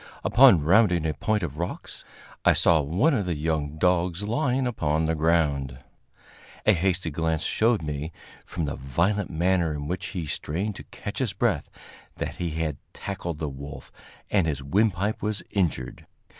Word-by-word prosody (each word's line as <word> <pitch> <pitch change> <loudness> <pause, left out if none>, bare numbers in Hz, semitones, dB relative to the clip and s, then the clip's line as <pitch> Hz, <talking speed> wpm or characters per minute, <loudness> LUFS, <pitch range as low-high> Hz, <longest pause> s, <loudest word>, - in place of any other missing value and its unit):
Upon 120 - +6
rounding 90 -1 +4
a 80 - 0
point 105 +7 0
of 75 -2 -4
rocks, 85 - -5 0.4
I - - +6
saw 80 -2 +4
one 90 - +2
of 105 -8 0
the 85 - 0
young 75 -1 -2
dogs 90 +2 +1
lying 130 +4 0
upon 80 -10 0
the 80 - +1
ground. 75 -5 +1 0.9
A 105 - +6
hasty 90 -1 0
glance 80 +1 -1
showed 110 -5 +2
me, 75 +1 -4 0.3
from 80 - -4
the 70 - -3
violent 85 +10 0
manner 85 -1 +1
in 75 -1 -5
which 90 +2 -3
he 90 -5 -4
strained 90 +8 -3
to - - -10
catch 100 - -7
his 125 -7 0
breath, 100 -7 0 0.5
that - - -4
he 85 - -2
had 80 -2 -2 0.2
tackled 90 -5 -5
the 75 - -3
wolf 70 +1 -8 0.4
and 95 -5 +3
his 70 -3 -2
windpipe 100 +6 +1
was 105 -1 -2
injured. 85 -10 -2
85 Hz, 165 wpm, -26 LUFS, 75-100 Hz, 0.9 s, Upon